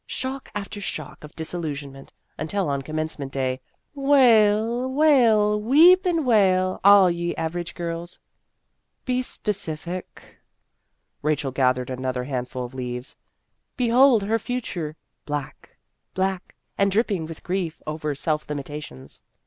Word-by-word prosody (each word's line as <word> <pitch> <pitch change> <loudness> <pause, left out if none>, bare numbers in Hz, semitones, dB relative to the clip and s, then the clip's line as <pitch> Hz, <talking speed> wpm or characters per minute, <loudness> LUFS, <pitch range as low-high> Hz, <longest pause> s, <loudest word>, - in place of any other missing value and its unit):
Shock 265 +1 -5
after 205 0 -5
shock 155 -7 -6
of 150 - -12
disillusionment, 150 -5 -5 0.2
until 170 +3 -2
on 140 -1 -1
Commencement 155 -1 -4
Day, 130 -1 -2 0.3
wail, 240 -3 +4
wail, 230 -8 +4
weep 335 - +6
and 330 -4 +1
wail, 185 -5 +3
all 200 -2 +7
ye 170 0 -2
average 170 +1 -4
girls." 170 0 -5 0.4
" - - -51
Be 255 0 0
specific." 180 -7 -5 0.8
Rachel 150 -2 0
gathered 130 -1 +1
another 130 0 -3
handful 125 -1 -4
of 120 - -10
leaves. 125 0 -5 0.6
"Behold 245 -2 +5
her 225 +3 0
future 180 -12 -4 0.3
black 145 -2 -6 0.4
black 190 -1 -2 0.2
and 200 0 +3
dripping 200 -6 0
with 165 -1 -10
grief 180 -3 -2
over 155 -1 -3
self 150 +1 -2
limitations. 145 - -7
175 Hz, 120 wpm, -24 LUFS, 145-220 Hz, 0.8 s, all